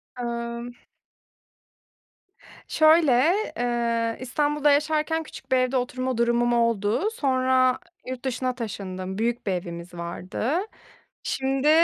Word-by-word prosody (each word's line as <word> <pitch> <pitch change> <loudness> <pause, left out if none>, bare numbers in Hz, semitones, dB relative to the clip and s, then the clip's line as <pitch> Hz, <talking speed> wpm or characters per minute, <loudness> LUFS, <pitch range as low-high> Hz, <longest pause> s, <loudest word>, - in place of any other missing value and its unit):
Imm 235 0 -4 1.9
Şöyle, 315 -2 +5 0.5
eee, 235 -1 0
İstanbul'da 295 +3 +1
yaşarken 310 +2 +1
küçük 265 -3 -12
bir 260 - +5
evde 255 +1 +1
oturma 255 0 -2
durumum 235 0 +2
oldu. 230 - +1
Sonra 260 - +2 0.3
yurt 255 0 -6
dışına 255 0 -1
taşındım, 190 -5 -5
büyük 235 +1 -1
bir - - +2
evimiz 175 -1 -5
vardı. 175 +7 -4 0.7
Şimdi 270 +2 0
245 Hz, 100 wpm, -25 LUFS, 230-265 Hz, 1.9 s, Şöyle